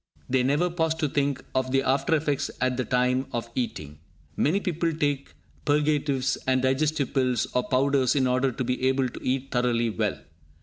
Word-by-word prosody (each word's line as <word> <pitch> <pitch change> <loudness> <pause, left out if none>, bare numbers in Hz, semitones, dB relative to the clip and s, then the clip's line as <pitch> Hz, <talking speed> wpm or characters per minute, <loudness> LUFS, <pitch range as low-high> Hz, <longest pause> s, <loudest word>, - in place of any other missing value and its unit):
They 130 0 +2
never 145 +7 +1
pause 160 -2 0
to 155 -2 0
think 140 -1 -1
of 130 0 0
the 135 0 +2
after 135 +4 +2
effects 145 -2 -1
at 125 0 +1
the 130 - -1
time 125 +1 +1
of 115 0 -4
eating. 75 - -4 0.4
Many 165 +8 +2
people 170 -3 -1
take 145 - -2 0.3
purgatives 145 -2 +1
and 130 0 +2
digestive 140 +2 +1
pills 130 -4 +1
or 125 - 0
powders 135 0 +2
in 135 -2 +3
order 130 +1 +2
to 125 - -3
be 125 +1 0
able 130 -1 +1
to - - -10
eat 135 +1 -1
thoroughly 120 -2 +1
well. 105 -1 -1
130 Hz, 180 wpm, -26 LUFS, 125-145 Hz, 0.4 s, in